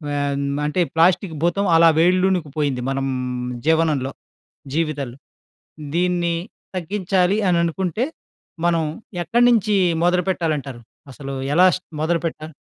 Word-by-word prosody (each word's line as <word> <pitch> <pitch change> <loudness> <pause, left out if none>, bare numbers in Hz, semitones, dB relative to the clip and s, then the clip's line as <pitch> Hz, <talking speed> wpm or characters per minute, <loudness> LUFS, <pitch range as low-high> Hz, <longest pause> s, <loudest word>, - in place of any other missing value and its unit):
ఆహ్, 140 -1 -1 0.3
అంటే 150 +5 0
ప్లాస్టిక్ 170 0 +3
భూతం 195 +3 +1
అలా 165 0 +7
వేళ్లునుకు 180 -1 +2
పోయింది 140 -4 0
మనం 135 0 -1 0.6
జీవనంలో, 155 -5 +2 0.6
జీవితంలో. 145 -6 -2 0.8
దీన్ని 175 -1 +1 0.4
తగ్గించాలి 185 +1 0
అని 175 -1 +3
అనుకుంటే 185 +7 -1 0.6
మనం 170 -1 +2 0.4
ఎక్కడి 235 +9 +2
నుంచి 215 -2 +2 0.3
మొదలుపెట్టాలంటారు? 165 -8 0 0.3
అసలు 135 +1 -7 0.2
ఎలా 180 +4 +6
స్టా 185 - -12
మొదలుపెట్టా 160 -1 -2
170 Hz, 105 wpm, -21 LUFS, 150-185 Hz, 0.8 s, అలా